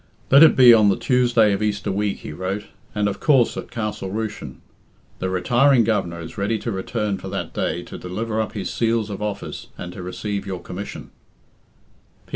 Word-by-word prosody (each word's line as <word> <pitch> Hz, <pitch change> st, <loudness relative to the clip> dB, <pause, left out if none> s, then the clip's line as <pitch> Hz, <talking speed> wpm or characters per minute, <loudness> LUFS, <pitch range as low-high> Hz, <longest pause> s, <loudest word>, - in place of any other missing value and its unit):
"Let 140 Hz, +2 st, +8 dB
it 160 Hz, -, +8 dB
be 125 Hz, -2 st, +9 dB
on 105 Hz, -3 st, +5 dB
the 95 Hz, -, +2 dB
Tuesday 120 Hz, -5 st, +3 dB
of 100 Hz, -, -2 dB
Easter 105 Hz, -2 st, -1 dB
week," 100 Hz, +1 st, -2 dB
he -, -, -7 dB
wrote, 95 Hz, +5 st, -3 dB, 0.3 s
"and 105 Hz, 0 st, +1 dB
of 100 Hz, -, -3 dB
course 135 Hz, -6 st, +3 dB
at -, -, -6 dB
Castle 105 Hz, -4 st, -4 dB
Rushen. 110 Hz, +1 st, -5 dB, 0.6 s
The 95 Hz, -, -2 dB
retiring 120 Hz, +7 st, +3 dB
Governor 105 Hz, -6 st, -1 dB
is 85 Hz, +5 st, -8 dB
ready 105 Hz, +3 st, 0 dB
to 115 Hz, -, -4 dB
return 100 Hz, 0 st, -2 dB
for -, -, -7 dB
that -, -, -4 dB
day -, -, -2 dB
to -, -, -9 dB
deliver 110 Hz, +5 st, -3 dB
up 110 Hz, -, -4 dB
his 100 Hz, -4 st, -4 dB
seals 115 Hz, -2 st, 0 dB
of 100 Hz, -, -6 dB
office 105 Hz, -1 st, -5 dB
and 90 Hz, 0 st, -7 dB
to 100 Hz, -, -8 dB
receive 100 Hz, +3 st, -4 dB
your 95 Hz, -2 st, -4 dB
commission." 90 Hz, +3 st, -8 dB
105 Hz, 190 wpm, -22 LUFS, 95-115 Hz, 0.6 s, be